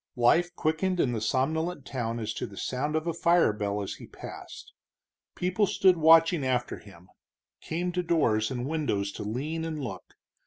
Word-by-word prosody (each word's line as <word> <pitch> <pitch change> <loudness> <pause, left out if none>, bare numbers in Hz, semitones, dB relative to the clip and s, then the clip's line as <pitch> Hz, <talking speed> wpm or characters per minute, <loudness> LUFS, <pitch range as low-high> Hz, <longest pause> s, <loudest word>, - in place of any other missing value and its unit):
Life 170 +9 +3
quickened 180 +4 0
in 130 - +2
the 115 -3 -2
somnolent 155 +6 -1
town 115 -3 -3
as 110 -1 -3
to - - -4
the 100 -3 -13
sound 145 +8 -2
of 155 +1 -1
a 170 - -1
fire 170 -6 +3
bell 105 -1 -2
as 95 - -6
he - - -10
passed; - - -10 0.6
people 185 +3 +1
stood 185 -1 +4
watching 165 0 +5
after 125 -2 -1
him; 90 -3 -16 0.5
came 175 +2 -2
to 180 0 -1
doors 115 -11 +1
and 125 -1 -3
windows 135 -10 -1
to - - -7
lean 145 +10 -3
and 160 -2 -4
look. 110 - -7
150 Hz, 180 wpm, -28 LUFS, 115-165 Hz, 0.6 s, watching